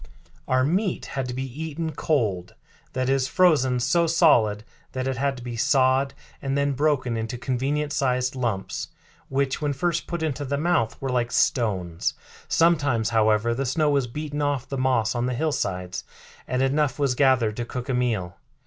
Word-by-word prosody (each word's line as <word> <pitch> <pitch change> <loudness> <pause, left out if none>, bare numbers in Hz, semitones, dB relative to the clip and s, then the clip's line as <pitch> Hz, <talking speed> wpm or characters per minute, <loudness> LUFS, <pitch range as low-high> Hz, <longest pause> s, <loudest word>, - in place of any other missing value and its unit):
Our 130 0 +3
meat 185 +7 0
had 135 -2 -3
to 125 - -4
be 130 - -2 0.2
eaten 160 0 -3
cold 110 - -1 0.4
that 130 0 -1
is, 135 -1 +2
frozen 140 -9 +3
so 170 +7 +2
solid 120 - +4 0.3
that 130 0 -2
it 135 -1 -2
had 135 +1 0
to 125 - -9
be 120 -1 -5
sawed 130 +2 +2 0.3
and 135 0 -1
then 140 0 +1
broken 135 -3 +1
into 115 +2 -3
convenient 140 +4 -1
sized 130 -2 0
lumps, 115 -7 -2 0.4
which 135 +1 0
when 145 -1 0
first 170 +4 -1
put 170 -2 -3
into 145 -2 -2
the 140 +1 -2
mouth 155 -8 0
were 135 -1 -3
like 120 -1 0
stones. 95 -9 0 0.3
Sometimes, 145 -9 +2
however, 110 +1 +3
the 135 +4 -2
snow 150 +3 +1
was 140 -3 +1
beaten 150 +3 -4
off 145 -3 -1
the 140 - -4
moss 130 -4 +1
on 120 0 -1
the 125 - -1
hillsides 95 - -2 0.4
and 130 +1 0
enough 135 0 +1
was 140 -3 +1
gathered 125 -5 +3
to 120 - -2
cook 125 +2 -6
a 135 - -1
meal." 110 -8 -1
130 Hz, 175 wpm, -25 LUFS, 120-145 Hz, 0.4 s, solid